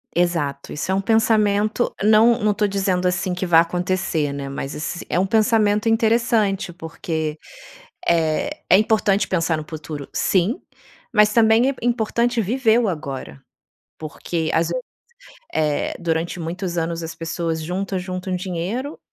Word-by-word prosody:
Exato. 165 -5 -1
Isso 150 +5 -3
é - - +2
um 195 - +1
pensamento, 215 0 +2
não 220 +3 +5
não 210 -2 +2
tô 210 - 0
dizendo 190 -2 0
assim 185 0 -1
que 180 +1 -3
vá 170 -2 +6
acontecer, 175 -3 0
né. 140 -1 -5
Mas 135 0 -5
ess 155 +3 -5
é - - +1
um 190 - +2
pensamento 215 0 +2
interessante, 225 -4 +2
porque 160 -2 -4 0.7
eh, 165 - +1 0.2
é 185 - +7
importante 210 -2 +2
pensar 165 -3 +1
no 155 - -5
futuro, 155 -2 -7
sim, 195 - +1 0.5
mas 210 -1 +5
também 225 +3 +4
é 275 - -4
importante 235 0 +1
viver 230 +2 +2
o 225 - +1
agora. 135 - -5 0.6
Porque 160 +1 -4
às 165 0 +2
vezes 170 -1 -3 0.7
eh, 150 -2 0
durante 165 +1 -2
muitos 175 +1 -4
anos 165 0 -2
as 165 0 -6
pessoas 165 0 -3
juntam, 190 +3 -3
juntam 185 0 -4
dinheiro 190 - -4
185 Hz, 145 wpm, -21 LUFS, 165-215 Hz, 0.7 s, é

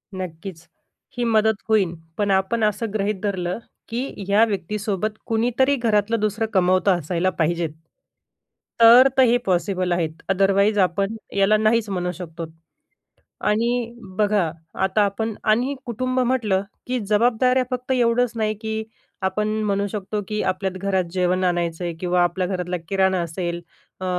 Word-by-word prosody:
नक्कीच, 175 -1 -7 0.5
ही 240 - 0
मदत 220 -1 +3
होईल; 195 -6 +3 0.2
पण 205 -1 +1
आपण 190 +4 +1
असं 215 +1 0
गृहीत 210 0 0
धरलं, 185 -1 -2 0.3
की 245 +4 -2 0.2
ह्या 205 +3 +5
व्यक्तीसोबत 210 0 -2
कुणीतरी 245 +5 +2
घरातलं 225 -2 +1
दुसरं 215 +2 0
कमावतं 185 0 +3
असायला 175 +3 0
पाहिजेत, 170 0 +1 1.1
तर 240 +3 +9
तर 260 - +7
हे 245 0 +4
पॉसिबल 185 0 0
आहे. 175 -2 +1 0.2
आदरवाईज 195 +2 +3
आपण 195 +3 +1 0.2
याला 200 +2 +4
नाहीच 220 0 +2
म्हणू 180 -2 -2
शकतो. 165 -1 -7 1.0
आणि 235 +2 0 0.3
बघा, 205 -6 +2 0.3
आता 190 +3 +2
आपण 220 +3 -2 0.2
आणि 250 +6 +2
कुटुंब 255 +2 -1
म्हटलं, 235 -7 +1 0.3
की 250 0 -1
जबाबदाऱ्या 245 +4 +3
फक्त 255 +1 -3
एवढंच 245 -1 +2
नाही, 215 -1 0
की 220 0 -3 0.4
आपण 200 +3 0 0.2
म्हणू 200 0 0
शकतो, 205 +1 -4
की 210 0 -2
आपल्या 190 +1 -1
घरात 190 0 0
जेवण 185 0 +1
आणायचं 175 -1 0
आहे 170 - -2
किंवा 180 -1 +2
आपल्या 180 +1 0
घरातला 180 -1 -2
किराणा 190 -1 +2
असेल, 170 +1 -3 0.4
अ, 185 - -3
200 Hz, 140 wpm, -22 LUFS, 185-225 Hz, 1.1 s, तर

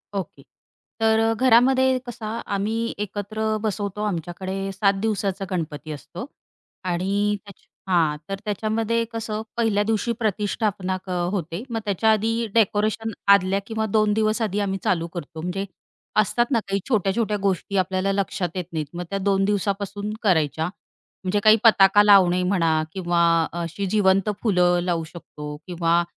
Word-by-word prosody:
Okay. 155 -7 -5 0.6
तर 225 0 +3
घरामध्ये 260 +2 +4
कसा 235 -2 -6 0.3
आम्ही 225 +3 -1
एकत्र 215 +2 -2
बसवतो, 210 -1 -3
आमच्याकडे 190 +1 -3
7 200 +1 +2
दिवसाचा 200 -3 -1
गणपती 155 -3 -4
असतो 150 - -7 0.6
आणि 195 +4 0
त्याच 200 -2 -15 0.3
हां 160 -5 +2
तर 195 0 -3
त्याच्यामध्ये 220 +2 0
कसं 220 -1 -3 0.2
1ल्या 215 -3 +2
दिवशी 225 +2 0
प्रतिष्ठापना 205 -3 -1
क - - -11 0.2
होते. 175 0 -3
मग 230 -1 -2
त्याच्या 210 +2 +2
आधी 225 +2 +1
डेकोरेशन 220 0 +1 0.2
आदल्या 195 0 +2
किंवा 220 -1 -2
2 215 -1 +3
दिवस 215 +2 +1
आधी 210 -2 0
आम्ही 195 -1 -1
चालू 170 -2 +1
करतो 160 -2 -7
म्हणजे 180 +4 -3 0.6
असतात 240 +3 +1
ना 235 - +3
काही 195 0 0
छोट्या-छोट्या 210 -1 +1
गोष्टी 195 0 -1
आपल्याला 185 +1 +1
लक्षात 195 -3 -1
येत 180 - -2
नाहीत. 155 -2 -2
मग 175 - -4
त्या 195 - -2
2 195 0 +2
दिवसापासून 200 +1 -2
करायच्या. 160 -5 +2 0.6
म्हणजे 190 +2 +1
काही 215 +1 +7
पताका 205 -2 +6
लावणे 185 -3 +6
म्हणा, 165 -4 +2
किंवा 175 -2 0 0.4
अशी 170 +4 -4
जिवंत 195 0 +2
फुलं 180 -4 +3
लावू 170 -2 -1
शकतो, 150 -3 -9
किंवा 170 -1 +1
200 Hz, 140 wpm, -23 LUFS, 180-215 Hz, 0.6 s, काही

